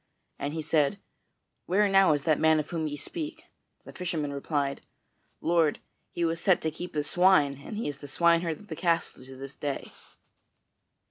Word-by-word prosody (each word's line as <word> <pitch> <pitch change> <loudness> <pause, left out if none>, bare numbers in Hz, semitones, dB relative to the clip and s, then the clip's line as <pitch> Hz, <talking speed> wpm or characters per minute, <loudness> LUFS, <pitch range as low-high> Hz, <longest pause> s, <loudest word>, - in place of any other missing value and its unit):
And 145 +2 -3
he 160 - -3
said, 150 +3 +2 0.7
"Where 205 +3 +3
now 195 -4 +5
is 145 -1 -1
that 155 -3 +2
man 160 0 +4
of 150 - -4
whom 160 -2 -1
ye 145 -1 -4
speak?" 315 - -6 0.4
The - - -11
fisherman 160 -5 -3
replied: 140 -1 -2 0.6
"Lord, 165 -2 +2 0.3
he 170 - -1
was 165 +1 -1
set 190 -3 +4
to 160 - 0
keep 175 +3 -7
the 150 - 0
swine, 150 -5 +3
and 210 - -6
he 225 - -2
is 145 -1 -5
the 145 - -9
swineherd 170 +2 +2
of 210 - -15
the 160 - -5
castle 165 -5 0
to 130 +1 -11
this 135 +1 -8
day." 145 -2 -4
160 Hz, 185 wpm, -28 LUFS, 145-175 Hz, 0.7 s, now